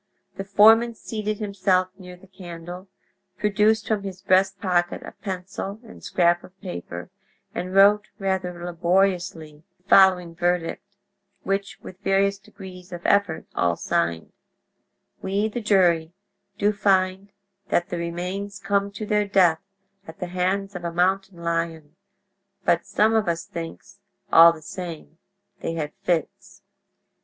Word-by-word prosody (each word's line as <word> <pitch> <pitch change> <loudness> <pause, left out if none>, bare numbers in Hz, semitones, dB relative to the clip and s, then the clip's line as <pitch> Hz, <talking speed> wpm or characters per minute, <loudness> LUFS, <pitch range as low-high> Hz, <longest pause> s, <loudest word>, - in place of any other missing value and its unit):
The 195 - -4
foreman 225 +4 +5
seated 215 -1 -4
himself 190 -3 +1
near 180 -1 -12
the 185 - -18
candle, 180 -1 -9 0.5
produced 210 +1 +2
from 215 -2 0
his 190 -2 -7
breast 190 +1 +3
pocket 175 -4 0
a - - -8
pencil 195 +1 -6
and 225 - -14
scrap 175 -1 +2
of 190 +1 -16
paper, 85 - -7 0.4
and 185 +2 -4
wrote 205 +2 +5
rather 185 -3 -2
laboriously 175 -3 0
the 180 - -39
following 185 -3 +5
verdict, 175 0 -1 0.6
which 195 0 -2
with 185 - -11
various 200 0 +1
degrees 185 -2 -12
of 175 -1 -8
effort 200 -5 +2
all 85 -1 +1
signed: 85 -1 -2 0.9
"We, 200 +3 0
the 235 +3 -4
jury, 175 -6 +3 0.4
do 205 +1 +2
find 195 -1 +1 0.4
that 175 - +1
the 175 - -3
remains 180 +4 -4
come 200 0 0
to 215 +2 -5
their 210 0 +1
death 180 -5 +3 0.5
at 160 - -11
the 180 - -4
hands 195 +2 -1
of 180 - -6
a 170 - -2
mountain 185 0 0
lion, 165 -2 -3 0.7
but - - +2
some 220 +1 +2
of 220 -3 +2
us 170 -1 -1
thinks, 170 +4 -8 0.3
all 165 +1 +9
the 160 -2 -10
same, 165 -1 -8 0.4
they - - -3
had 150 -2 -4
fits." 175 -5 -3
185 Hz, 140 wpm, -24 LUFS, 170-200 Hz, 0.9 s, all